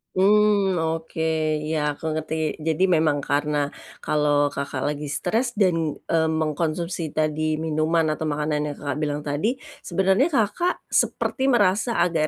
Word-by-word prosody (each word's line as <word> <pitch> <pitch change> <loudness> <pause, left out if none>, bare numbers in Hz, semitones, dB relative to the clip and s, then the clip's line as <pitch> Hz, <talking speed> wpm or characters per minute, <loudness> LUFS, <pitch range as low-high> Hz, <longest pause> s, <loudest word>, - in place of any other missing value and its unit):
Hmm. 200 0 +4
Oke, 160 0 -2 0.4
iya, 150 -2 -1
aku 160 +1 -4
ngerti. 155 0 -2
Jadi, 160 +3 0
memang 150 -3 +1
karena 145 0 0 0.3
kalau 145 -1 +2
Kakak 140 -1 -4
lagi 150 0 -5
stres 230 - -1
dan, 165 -7 +1
eee, 160 -1 +1
mengkonsumsi 160 +1 -2
tadi 155 0 0
minuman 160 +1 +1
atau 155 +1 -3
makanan 150 0 -1
yang 145 - -5
Kakak 145 0 -4
bilang 150 -1 -2
tadi, 155 - -1 0.2
sebenernya 190 - +2
Kakak 300 - 0
seperti 265 0 +1
merasa 220 -1 +2
agak 165 -3 +1
160 Hz, 135 wpm, -24 LUFS, 150-185 Hz, 0.4 s, Hmm